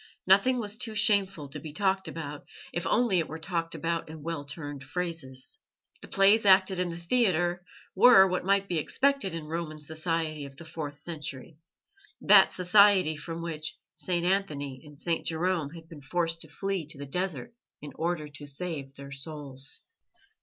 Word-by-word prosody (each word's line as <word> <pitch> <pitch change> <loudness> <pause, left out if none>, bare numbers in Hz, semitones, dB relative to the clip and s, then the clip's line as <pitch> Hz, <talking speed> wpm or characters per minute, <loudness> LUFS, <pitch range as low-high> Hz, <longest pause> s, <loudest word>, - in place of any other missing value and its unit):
Nothing 200 +7 +5
was 210 -1 -4
too 220 -1 -4
shameful 195 -7 +2
to - - -7
be 155 - -8
talked 190 +1 +1
about, 150 -3 -6 0.3
if 175 0 -2
only 220 -4 +3
it 165 - -1
were 160 - -6
talked 165 0 -3
about 165 +1 -2
in 155 -2 -9
well 165 -2 -3
turned 145 -1 -7
phrases. 160 -4 -5 0.4
The - - -9
plays 200 +3 +5
acted 190 -1 +5
in 180 -1 0
the 165 - -5
theatre 175 -3 +1 0.3
were 195 -1 +8
what 185 -1 -1
might 195 +1 +2
be 170 -4 0
expected 270 - +1
in 165 -2 -5
Roman 155 -1 -4
society 155 -1 -2
of 135 0 -15
the 170 - -10
fourth 150 -3 -6
century 150 -1 -6 0.6
that - - +7
society 185 -2 +5
from 165 +3 -6
which 155 -1 -4 0.2
St. 175 -2 -1
Anthony 150 -9 -1
and 150 -2 -14
St. 165 +2 -1
Jerome 165 -2 0
had 165 -1 -11
been 160 -3 -11
forced 165 +3 -1
to 160 - -6
flee 190 +1 -3
to 150 - -9
the 140 - -6
desert 170 - -2 0.3
in 145 -1 -9
order 165 0 -2
to 145 0 -10
save 140 -2 -4
their 140 0 -10
souls. 135 -1 -5
165 Hz, 175 wpm, -28 LUFS, 150-185 Hz, 0.6 s, were